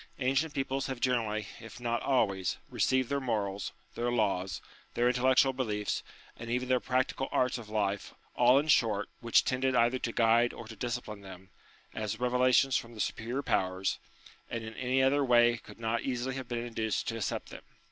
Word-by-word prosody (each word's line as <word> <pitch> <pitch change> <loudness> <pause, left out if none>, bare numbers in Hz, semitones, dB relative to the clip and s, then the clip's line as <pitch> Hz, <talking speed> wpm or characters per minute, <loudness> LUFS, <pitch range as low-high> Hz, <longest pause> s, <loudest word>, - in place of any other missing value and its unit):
Ancient 135 +4 0
peoples 135 0 -1
have 130 -2 -4
generally, 115 -4 0
if 115 +2 -11
not 120 -1 -1
always, 100 -8 +1
received 130 -1 +2
their 140 - 0
morals, 105 -6 -2 0.2
their 120 +1 -1
laws, 95 -6 0 0.4
their 120 - +3
intel 125 +1 -1
lectual 130 0 +4
beliefs, 105 -5 -1 0.3
and 115 - -8
even 125 +1 -1
their 130 -1 +4
practical 130 +1 -1
arts 125 -1 +1
of 110 -3 -11
life, 100 -2 -2 0.2
all 125 +2 +6
in 145 +2 +1
short 110 -8 +3
which 115 -1 +3
tended 130 0 +1
either 120 +2 +3
to 120 - -2
guide 115 +1 +3
or 115 - -9
to 115 - -9
discipline 120 -2 -4
them, 95 -1 -12 0.4
as 110 0 -3
revelations 125 +1 +3
from 115 0 -2
the - - -11
superior 120 +6 -2
powers, 95 -4 0 0.5
and 115 -1 -4
in 110 0 -7
any 130 +3 +1
other 140 +2 +3
way 120 -2 +5
could - - -14
not 115 +1 -1
easily 130 0 -2
have 130 -1 -6
been 120 -1 -3
induced 110 -3 -2
to 115 - -2
accept 110 - -3
them. - - -9
120 Hz, 185 wpm, -31 LUFS, 110-130 Hz, 0.5 s, all